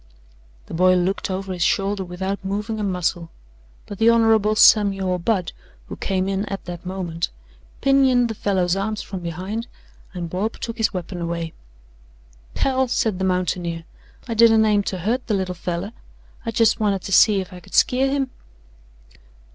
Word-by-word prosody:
The - - -11
boy 185 +2 +4
looked 185 +3 0
over 190 0 -3
his 180 - -6
shoulder 195 +3 +1
without 190 +3 -4
moving 210 +3 -3
a - - -2
muscle, 180 -3 -1 0.6
but 205 - -9
the 225 +1 +5
Hon. 225 -2 +4
Samuel 195 -4 +4
Budd, 185 -1 0 0.4
who - - -7
came 190 -1 -1
in 195 0 -1
at 195 -1 -5
that 175 0 -7
moment, 175 -3 -3 0.5
pinioned 265 -3 +4
the 225 - -4
fellow's 190 -4 0
arms 210 +2 -2
from 195 - -6
behind 185 +7 -5 0.5
and 175 -1 -4
Bob 190 +7 -2
took 230 0 -5
his 220 - +2
weapon 180 -1 -5
away. 170 -1 -3 1.0
"Hell," 265 -1 +1
said 220 -5 0
the 190 - 0
mountaineer, 175 -2 -1 0.4
"I 230 - -2
didn't 225 -1 +5
aim 210 -1 +3
to 190 - -2
hurt 225 +9 -2
the 215 - +1
little 190 -2 -2
feller. 180 +3 -4 0.6
I - - +1
jes' 225 0 +2
wanted 200 -3 0
to - - -6
see 200 +1 +6
if 185 0 -6
I 180 - -9
could 175 - -10
skeer 265 +2 +3
him." 270 -2 -1
195 Hz, 170 wpm, -22 LUFS, 180-220 Hz, 1.0 s, see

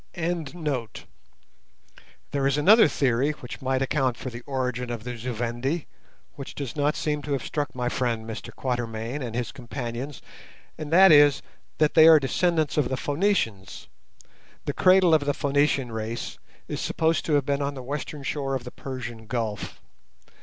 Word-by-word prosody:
There 150 - -6
is 140 +1 +1
another 205 +9 +7
theory 135 0 +1
which 125 -4 -9
might 130 0 0
account 130 -3 0
for 130 - -6
the 120 +1 -8
origin 125 -2 -2
of 120 -2 -5
the 125 0 -5
Zu 120 +2 -4
Vendi 120 +7 -2 0.5
which 140 - -9
does 135 -5 -5
not 145 0 +1
seem 150 -1 -1
to 145 0 -3
have 135 - -2
struck 145 -3 -3
my 125 -1 -1
friend 120 -3 -1
Mr 110 - -7
Quatermain 120 +1 -3
and 120 -3 -5
his 120 -1 -2
companions, 125 +1 -6 0.5
and 155 -1 -7
that 190 +2 +8
is, 145 -2 +6 0.3
that 155 -1 +2
they 160 0 +8
are 160 -1 +9
descendants 155 +2 0
of 145 -5 +2
the 130 - -1
Phœnicians. 140 - -1 0.8
The - - -1
cradle 185 -2 +5
of 150 -2 +3
the 145 - +1
Phœnician 140 -3 +1
race 110 +1 -5 0.3
is - - -4
supposed 160 0 +1
to 155 - 0
have 145 -2 +3
been 140 0 0
on 140 0 -2
the 130 - -7
western 145 +2 -5
shore 135 0 -2
of 130 - -4
the 125 - -8
Persian 120 -4 -7
Gulf. 115 -3 -4
135 Hz, 165 wpm, -25 LUFS, 120-150 Hz, 0.8 s, are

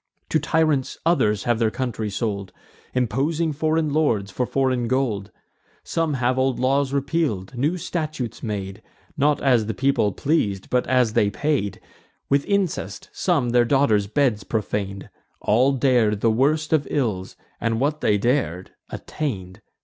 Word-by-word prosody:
To 155 - +2
tyrants 155 -3 +1
others 125 - +2
have 120 -2 +1
their 115 -2 +3
country 115 -3 -3
sold, 100 -2 -3 0.4
Imposing 145 +7 0
foreign 155 0 0
lords, 115 -11 +1
for 120 +7 -1
foreign 130 -3 0
gold; 115 -6 -1 0.5
Some 165 -3 -1
have 130 0 +1
old 130 -1 +1
laws 135 +1 +1
repeal'd, 140 - -1
new 150 +9 0
statutes 155 - -4
made, 100 -2 -4 0.3
Not 145 +1 +2
as 125 -6 +3
the 110 - -3
people 135 -6 +2
pleas'd, 100 - -1
but 125 0 +1
as 125 -3 +2
they 105 - +3
paid; 130 -3 -1 0.5
With 140 0 +3
incest 200 -4 -2
some 145 -10 +1
their 120 0 +5
daughters' 115 -6 +2
bed 125 -2 +1
profan'd: 100 -3 -2 0.3
All 125 +6 +3
dar'd 120 -6 +2
the 115 - +3
worst 150 +7 +1
of 155 -2 +2
ills, 105 -10 -2 0.2
and, 115 -1 0
what 150 +3 0
they 105 - +3
dar'd, 105 - -1 0.2
attain'd. 95 -12 -5
125 Hz, 145 wpm, -23 LUFS, 105-145 Hz, 0.5 s, their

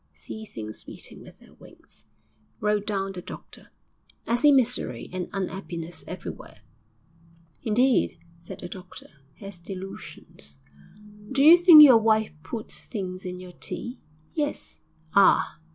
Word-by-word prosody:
'Sees 220 -1 -10
things 110 -1 -8
beating - - -10
with - - -14
their - - -19
wings,' - - -18 0.5
wrote 210 0 0
down 195 -2 -1
the 185 -2 -7
doctor. - - -11 0.6
'I 235 - +1
see 295 +4 +5
misery 250 - +1
and 185 -1 -4
un'appiness 175 -3 -5
everywhere.' - - -8 1.0
'Indeed!' 245 +1 +2 0.2
said 170 - -10
the 175 - -6
doctor. 185 0 -10 0.3
'Has 195 -3 -9
delusions. 185 - -9 0.7
Do 275 +1 +2
you 320 +3 +10
think 345 -3 +10
your 255 -6 +8
wife 220 -3 +2
puts 215 +7 -6
things 185 -4 -6
in 180 0 -5
your 180 -1 -11
tea?' 240 +7 -5 0.3
'Yes.' 295 -2 -3 0.3
'Ah!' 200 -4 +4
200 Hz, 130 wpm, -26 LUFS, 180-240 Hz, 1.0 s, you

